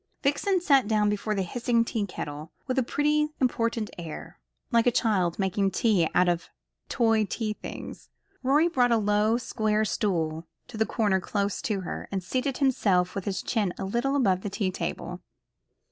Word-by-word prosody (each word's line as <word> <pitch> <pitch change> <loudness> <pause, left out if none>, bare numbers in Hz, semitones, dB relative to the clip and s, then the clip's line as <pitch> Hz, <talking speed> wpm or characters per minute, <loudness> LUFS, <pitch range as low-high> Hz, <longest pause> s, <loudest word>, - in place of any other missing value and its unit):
Vixen 365 +7 +2
sat 275 -9 +4
down 210 -1 +2
before 210 +1 -2
the 195 - 0
hissing 235 +4 +1
tea 215 -3 -2
kettle 150 -3 -6
with 260 0 0
a - - +2
pretty 300 +4 +1
important 230 -3 0
air, 165 -3 -8 0.3
like 230 0 +3
a - - +6
child 200 -8 +1
making 195 0 +1
tea 190 -3 +2
out 180 - +4
of 175 -1 0 0.4
toy 225 -3 +3
tea 215 +1 -2
things. - - -9 0.3
Rorie 290 +5 +4
brought 250 -7 +2
a 230 - +5
low 210 +2 +2
square 215 -3 0
stool 165 -6 -1 0.2
to 220 -2 -6
a 220 - +3
corner 205 -4 +1
close 200 +1 -2
to 205 -4 -1
her, 180 - -6
and 190 -2 -2
seated 255 +6 -1
himself 200 -10 +2
with 195 - -4
his 195 -2 -2
chin 205 -6 0
a 195 - -4
little 240 +8 0
above 195 -9 +2
the 205 - -4
tea 195 -1 -1
table. - - -5
215 Hz, 175 wpm, -27 LUFS, 190-245 Hz, 0.4 s, a